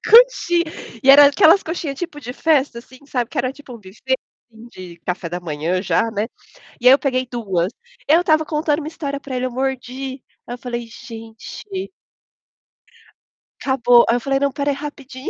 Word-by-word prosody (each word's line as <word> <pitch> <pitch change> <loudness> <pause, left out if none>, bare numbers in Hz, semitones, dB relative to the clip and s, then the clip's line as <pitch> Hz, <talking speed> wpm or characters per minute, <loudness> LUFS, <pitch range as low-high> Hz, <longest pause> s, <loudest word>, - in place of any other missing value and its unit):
Coxinha, 435 -7 +5 0.4
e 270 - +7
era 285 +1 +10
aquelas 320 +7 +5
coxinha 320 -3 -4
tipo 295 -1 -6
de 245 -2 -7
festa 280 -4 +1
assim, 255 +1 -14
sabe, 245 -4 -2
que 295 - -5
era 255 0 0
tipo 275 -3 -12
um 235 - -10
buffet 215 +7 -3 0.6
de 175 -2 -11
café 180 -1 -3
da 175 +1 -5
manhã 170 +3 -2
já, 225 +3 +1
né. 220 0 -2 0.6
E 250 - +3
aí 260 - +10
eu 275 - +4
peguei 255 -2 0
2, 195 -7 -1 0.4
eu 320 +4 +5
estava 315 -3 +2
contando 300 0 0
uma 305 - -6
história 280 -3 -4
para 275 -2 -7
ele 250 0 -1
eu 255 - -3
mordi, 265 +1 -4 0.2
aí 240 - -5
eu - - -13
falei: 240 -1 -5
"Gente" 225 -1 -10 2.0
Acabou, 245 -3 +4
aí 235 - +3
eu - - +1
falei: 270 +3 0
"Não, 280 0 +2
espera 285 +1 -1
aí - - -2
rapidinho." 275 -2 -7
260 Hz, 185 wpm, -20 LUFS, 235-290 Hz, 2.0 s, era